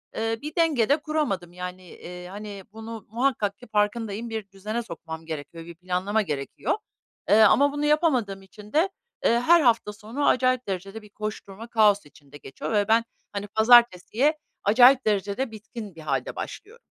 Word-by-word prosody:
Iıı, 225 0 -2
bir 300 +1 -7
denge 305 -10 +2
de 285 - +5
kuramadım, 295 - -2
yani, 180 0 -8
ııı, 180 0 -8
hani 205 0 -8
bunu 225 -1 -8
muhakkak 225 -4 0
ki 245 - -14
farkındayım, 215 +1 -1
bir 220 -3 -5
düzene 215 +5 -4
sokmam 160 -4 -8
gerekiyor, 160 +1 -7
bir 170 - -10
planlama 185 +5 -1
gerekiyor, 145 -7 -2 0.5
eee, 215 +2 +6
ama 280 +7 +5
bunu 290 0 -1
yapamadığım 270 - +1
için 205 +4 -15
de, 335 +6 +3 0.4
ııı, 235 +1 +4
her 335 +5 +6
hafta 230 -5 +2
sonu 225 +8 -3
acayip 255 -2 +2
derecede 195 +3 -5
bir 210 - -16
koşturma, 215 +1 -7
kaos 210 -5 +3
içinde 145 -1 -16
geçiyor 135 - -7
ve 205 0 +2
ben, 225 +1 +4 0.3
hani, 205 0 -4
pazartesiye 235 - +4 0.3
acayip 245 +5 +6
derecede 210 +4 0
bitkin 215 -3 -9
bir 160 - -11
hâlde 155 - -2
başlıyorum. 455 +4 -8
215 Hz, 165 wpm, -25 LUFS, 195-245 Hz, 0.5 s, eee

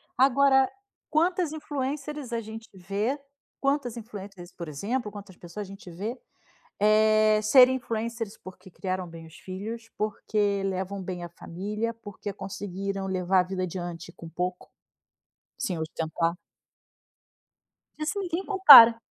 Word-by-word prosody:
Agora, 265 0 +4 0.4
quantas 340 +1 +1
influencers 290 -2 -4
a 230 - 0
gente 220 +1 -9
vê 200 +9 -2 0.4
quantas 275 -4 0
influencers, 200 -5 -9
por 170 -2 -8
exemplo, 210 - -3
quantas 200 -3 -11
pessoas 185 +3 -8
a - - -14
gente 195 -2 -11
vê, 215 +9 -5 0.6
eh, 215 0 +4
serem 255 +4 +7
influencers 230 -2 -4
porque 185 0 -13
criaram 185 0 -3
bem 165 -1 -11
os 160 - -15
filhos, 220 +5 -7
porque 205 -1 -1
levam 190 +1 -3
bem 180 -1 -5
a 175 - -6
família, 210 +7 -4
porque 205 -2 -7
conseguiram 195 0 -5
levar 185 0 +2
a - - +4
vida 185 0 -4
adiante 175 -1 -6
com 165 - -11
pouco, 180 +2 -4 0.9
sem 190 -10 -2
ostentar. 165 +1 -1 1.6
Isso 310 +7 -2
ninguém 360 -1 -2
compara. 280 - +10
210 Hz, 130 wpm, -27 LUFS, 185-245 Hz, 1.6 s, compara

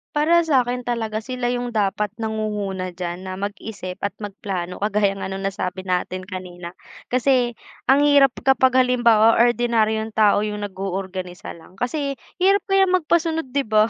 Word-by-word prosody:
Para 315 +3 +4
sa'kin 250 -4 +2
talaga 225 -3 -2
sila 245 +1 -2
'yong 245 0 -2
dapat 210 0 0
nangunguna 210 -4 -3
d'yan 175 +1 -5
na 185 - -4
mag-isip 200 -1 -6
at 200 - -2
mag 205 - -5
plano, 180 -5 -4
kagaya 205 -1 +1
nga - - -4
no'ng 195 0 -5
nasabi 185 -1 -3
natin 185 0 -2
kanina 180 -2 -8 0.4
kasi 250 -1 +2 0.4
ang 275 +2 +6
hirap 280 -2 +6 0.2
kapag 260 -1 +4
halimbawa 235 -3 +4
ordinaryong 225 -2 +1
tao 210 -2 +4
'yong 210 -1 -4
nag-o-organisa 190 -2 -5
lang 165 +3 -17
kasi 275 +6 -2 0.2
hirap 390 +2 +4
kaya 390 0 +4
magpasunod 330 -3 +1
'di 280 +1 +1
ba? 215 0 +4
215 Hz, 150 wpm, -22 LUFS, 195-250 Hz, 0.4 s, ang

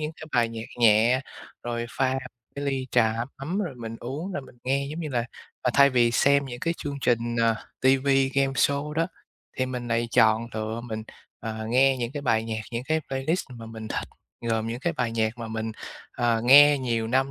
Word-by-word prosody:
những 155 +1 -3
cái 155 - -8
bài 120 -2 +3
nhạc 115 0 -6
nhẹ, 115 +3 +5 0.4
rồi 120 -1 -3
pha 130 0 +1 0.4
cái 140 0 -4
ly 135 -2 -1
trà 110 -2 +3 0.2
ấm 160 +8 -3
rồi 175 -10 -2
mình 115 -2 -7
uống 150 +10 -5
rồi 140 - -3
mình 125 - -16
nghe. 140 +2 0
Giống 160 - -5
như 160 - -3
là, 120 -4 -1 0.4
à, 125 - +2
thay 140 0 +7
vì 120 -2 +3
xem 140 +3 +3
những 120 -1 -7
cái 165 0 0
chương 140 -1 -5
trình, 120 -1 +1
ờ, 115 -1 +3 0.3
TV, 135 +1 +3 0.3
gameshow 140 +2 +1
đó, 165 +2 +1 0.5
thì 130 - 0
mình 125 -2 -5
lại 115 0 0
chọn 115 -1 +4
lựa 110 +1 -3
mình, 110 -2 -5 0.4
ờ, 110 0 -5
nghe 130 +3 +4
những 120 +1 -3
cái 145 - -4
bài 110 -4 +2
nhạc, 110 -1 -3
những 120 +2 -3
cái 160 +2 +1
playlist 135 +7 -1
mà 115 -2 -9
mình 110 -1 -8
thích, - - -3 0.3
gồm 115 -1 -1
những 115 +2 -4
cái 170 +4 0
bài 125 -6 -1
nhạc 110 +1 0
mà 115 -1 -5
mình, 110 0 -3 0.4
ờ, 120 -2 +2
nghe 145 +3 +8
nhiều 115 -3 -1
năm, 130 +3 +1
125 Hz, 210 wpm, -26 LUFS, 115-140 Hz, 0.5 s, nghe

